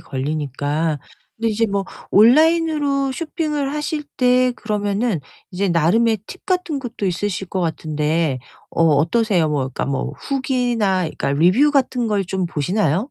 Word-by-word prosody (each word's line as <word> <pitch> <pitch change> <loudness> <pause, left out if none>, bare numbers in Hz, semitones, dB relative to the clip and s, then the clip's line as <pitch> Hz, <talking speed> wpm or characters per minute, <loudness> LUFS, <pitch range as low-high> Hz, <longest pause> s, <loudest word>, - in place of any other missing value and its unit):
걸리니까. 145 +2 -2 0.4
근데 230 +1 0
이제 225 +1 +1
뭐 200 -1 -1 0.3
온라인으로 290 - +4
쇼핑을 300 -2 -2
하실 300 0 -3
때 250 0 +3
그러면은 210 -3 -1 0.3
이제 195 +1 -1
나름의 205 +7 +3
팁 380 - -11
같은 360 -6 0
것도 240 -6 -4
있으실 190 +1 -2
것 190 - -2
같은데 155 -3 -1 0.3
어 - - 0
어떠세요? 165 +4 +2
뭐 150 -2 0
그러니까 130 - -3
뭐 135 -1 -2
후기나 245 -8 0
그러니까 155 -4 -2
리뷰 185 - +4
같은 260 -4 +1
걸 205 -3 0
좀 185 0 -2
보시나요? 175 - 0
205 Hz, 315 characters per minute, -20 LUFS, 165-260 Hz, 0.4 s, 온라인으로